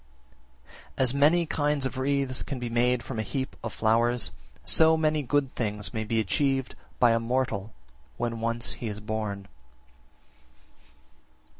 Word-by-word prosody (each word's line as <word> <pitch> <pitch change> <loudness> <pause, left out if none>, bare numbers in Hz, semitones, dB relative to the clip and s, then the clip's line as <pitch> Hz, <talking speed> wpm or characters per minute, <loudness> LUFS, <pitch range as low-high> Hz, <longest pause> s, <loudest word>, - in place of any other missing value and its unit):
53. - - +3
As 125 -1 +2
many 155 +5 +4
kinds 150 -2 0
of 130 - -3
wreaths 135 -1 0
can 140 - -4
be 120 -1 -4
made 120 +1 +2
from 120 -3 -5
a - - +2
heap 130 +5 -4
of 115 - -3
flowers, 115 -3 +2 0.3
so 160 - +5
many 155 -1 +1
good 140 0 0
things 105 -2 -3
may 110 -1 -2
be 110 +1 0
achieved 135 +5 0 0.2
by 120 -2 +5
a 115 - +3
mortal 115 -3 -1 0.5
when 115 -1 -2
once 115 +1 -1
he 120 - -6
is 105 -1 -4
born. 105 -2 -4
120 Hz, 150 wpm, -27 LUFS, 110-135 Hz, 0.5 s, so